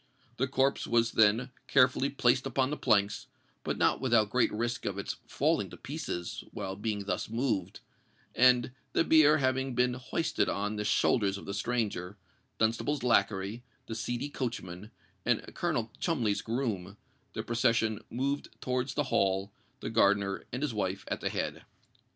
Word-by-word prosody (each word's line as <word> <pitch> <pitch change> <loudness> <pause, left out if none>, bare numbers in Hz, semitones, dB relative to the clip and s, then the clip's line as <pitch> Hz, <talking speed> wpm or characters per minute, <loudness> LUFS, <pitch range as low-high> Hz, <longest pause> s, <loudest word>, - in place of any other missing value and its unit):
The 130 - +1
corpse 135 +1 +1
was 115 0 +2
then 110 +4 +3 0.2
carefully 130 +1 +4
placed 125 -2 +2
upon 130 0 0
the - - 0
planks, 100 -7 +1 0.4
but - - -2
not - - +2
without 115 -5 +3
great 125 - +3
risk 120 +2 -2
of 100 -1 -2
its 100 - -4
falling - - +1
to - - -11
pieces 85 0 -5
while 95 0 -5
being 105 0 -2
thus 100 - -2
moved; 115 -6 -1 0.5
and, 125 0 +4 0.2
the - - +3
bier 155 -2 +6
having 130 -1 0
been 125 0 +2
hoisted 130 +6 -1
on 105 +1 -1
the 105 - -2
shoulders 100 -2 +2
of - - -10
the 100 - -4
stranger, 105 -3 -2 0.4
Dunstable's 115 +5 0
lacquey, 100 -1 +1 0.2
the 115 - -6
seedy 120 +5 -3
coachman, 110 -8 -5 0.3
and - - 0
Colonel 115 -1 -1
Cholmondeley's 115 - 0
groom, 105 -5 -3 0.4
the - - -3
procession 115 -2 +1
moved 140 +4 -2
towards 130 0 -2
the 145 - +1
Hall, 95 +1 +1 0.3
the - - -4
gardener 100 -3 +2
and 125 +4 -3
his 145 -6 -1
wife 95 -2 -2
at - - -3
the - - 0
head. - - -3
115 Hz, 155 wpm, -30 LUFS, 100-130 Hz, 0.5 s, bier